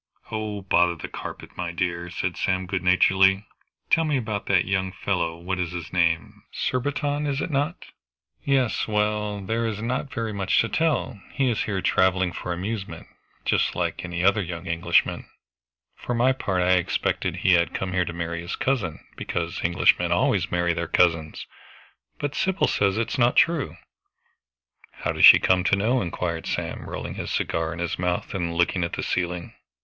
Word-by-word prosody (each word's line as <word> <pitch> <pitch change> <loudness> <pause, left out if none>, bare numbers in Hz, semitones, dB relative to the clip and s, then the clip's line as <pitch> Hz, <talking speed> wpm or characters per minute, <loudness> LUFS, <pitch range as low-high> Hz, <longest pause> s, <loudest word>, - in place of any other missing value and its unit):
"Oh, 105 -2 -4
bother 90 -2 +3
the - - -7
carpet, - - -8
my 90 -1 -3
dear," 85 0 -2
said 90 0 -3
Sam 95 0 0
good 95 0 -2
naturedly; 95 +2 +4 0.5
"tell 165 - +5
me 150 -3 +1
about 110 -4 -3
that 95 -3 +3
young 95 -1 -1
fellow 90 -3 -2
what 90 +2 -3
is 90 -1 -2
his 85 -1 -6
name? 85 -2 0
Surbiton, 145 +3 -1
is 140 -1 -1
not 150 +2 -1
it?" - - -11 0.6
"Yes 135 -4 +1
well, 105 -1 0
there 115 +4 -1
is 105 -2 -3
not 125 +5 -2
very 115 -2 -3
much 95 -1 +1
to 115 - -2
tell. 150 -9 0
He 135 -3 +1
is 110 - -1
here 95 -3 -2
traveling 95 -1 +2
for 90 - -5
amusement, 95 +3 -4 0.4
just - - +1
like - - -2
any 85 -1 -3
other 100 +2 +4
young 85 -1 -6
Englishman. 85 -2 +1 0.7
For 120 - -3
my 125 +3 +4
part 95 -8 -1
I 90 +1 +4
expected 90 - -1
he 95 - +3
had 85 -1 +2
come 95 -1 -3
here 90 -1 +1
to 85 - -4
marry 85 0 -4
his 85 - -4
cousin, 110 - -2
because 85 +1 -3
Englishmen 85 +1 +3
always - - +2
marry 85 -1 +1
their 85 0 -3
cousins. 80 -2 +1 0.7
But 145 -1 -3
Sybil 190 0 +1
says 100 0 +1
it 115 - 0
is - - -3
not 120 0 +4
true." 165 -4 +2 1.2
"How - - -3
does - - +5
she - - +11
come 90 -1 +2
to 100 - +4
know?" 115 +6 +1
inquired 85 -2 -3
Sam, - - -4
rolling - - -5
his - - -5
cigar 80 0 -1
in 85 - -6
his 85 0 -3
mouth 90 -1 -1
and 85 -3 -2
looking 85 +1 +1
at 85 - -3
the - - -3
ceiling. 90 -1 -2
95 Hz, 180 wpm, -24 LUFS, 85-110 Hz, 1.2 s, she